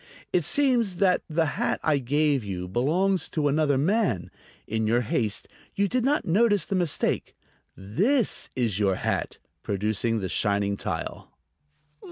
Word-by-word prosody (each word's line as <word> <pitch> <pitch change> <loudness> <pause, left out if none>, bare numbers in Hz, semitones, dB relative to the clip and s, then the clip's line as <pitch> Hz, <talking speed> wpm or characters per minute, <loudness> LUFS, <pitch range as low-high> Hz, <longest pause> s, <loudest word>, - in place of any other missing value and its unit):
It 175 - +3
seems 235 - +2
that 185 -1 +2
the 160 +1 +1
hat 145 - -1
I 150 -3 +2
gave 145 +1 +1
you 90 -3 -5
belongs 165 - +1
to 150 -2 0
another 145 -1 +2
man. 180 - 0 0.3
In 110 0 -1
your 120 +2 +2
haste 110 -2 -2 0.3
you 200 0 +2
did 250 +3 0
not 290 +4 +1
notice 205 +2 +3
the - - -4
mistake. 175 -5 -1 0.4
This 200 - 0
is 115 -6 0
your 100 -2 +2
hat," - - -2 0.2
producing 110 +3 -1
the 95 - -3
shining 100 +1 0
tile. - - -5
145 Hz, 145 wpm, -26 LUFS, -, 0.4 s, It